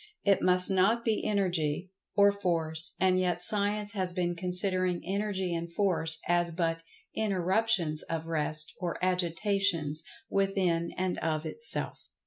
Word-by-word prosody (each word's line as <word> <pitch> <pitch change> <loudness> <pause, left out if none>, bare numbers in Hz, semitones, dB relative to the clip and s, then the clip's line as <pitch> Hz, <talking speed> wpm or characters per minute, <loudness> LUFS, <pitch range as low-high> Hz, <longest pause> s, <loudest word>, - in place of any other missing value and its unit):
It 200 -1 +2
must 180 +1 +2
not 200 +5 +1
be 225 -2 0
Energy 180 -4 -1 0.2
or 200 -1 +5
Force, 165 -4 -1
and 185 0 +2
yet 180 -2 -1
Science 205 +2 +2
has 185 -3 -3
been 175 -1 -1
considering 180 0 +1
Energy 190 -1 -2
and 170 0 -5
Force 170 -4 +4
as 175 0 +1
but 165 -1 -2 0.3
"interruptions 190 -5 0
of 165 -1 -4
rest" 155 -1 -1
or 175 -2 -4
"agitations" 180 -3 -1 0.2
within, 190 -4 -1
and 185 -1 -2
of, 155 -1 -2
itself. 460 - +2
180 Hz, 130 wpm, -29 LUFS, 165-195 Hz, 0.3 s, or